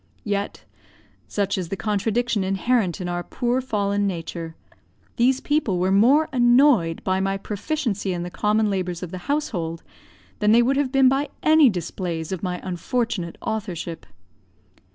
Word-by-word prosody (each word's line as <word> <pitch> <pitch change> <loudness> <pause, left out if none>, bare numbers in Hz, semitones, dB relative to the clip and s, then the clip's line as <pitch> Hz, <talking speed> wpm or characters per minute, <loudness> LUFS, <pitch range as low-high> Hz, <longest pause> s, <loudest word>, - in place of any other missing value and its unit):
Yet 205 -1 -3 0.6
such 200 -1 -1
is 175 -3 -4
the 195 - -2
contradiction 215 +1 0
inherent 195 -1 0
in 180 - -4
our 175 0 -2
poor 245 +7 -1
fallen 205 -4 0
nature 165 -2 -5 0.6
these 255 +2 +3
people 290 -12 0
were 185 +2 +1
more 255 +11 +5
annoyed 240 - +4
by 185 0 +1
my 195 0 0
proficiency 210 -1 -2
in 175 -1 -3
the 175 - -6
common 210 +1 +1
labours 180 -2 -3
of 175 - -6
the 185 - -5
household, 175 - -2 0.6
than 210 0 +4
they 235 +1 +6
would 270 +3 +1
have 280 -3 0
been 270 -1 +5
by 275 +3 +1
any 310 -3 +6
displays 175 -3 -4
of 190 - -3
my 180 -2 -3
unfortunate 190 -1 -2
authorship. 180 -6 -4
200 Hz, 155 wpm, -23 LUFS, 180-245 Hz, 0.6 s, they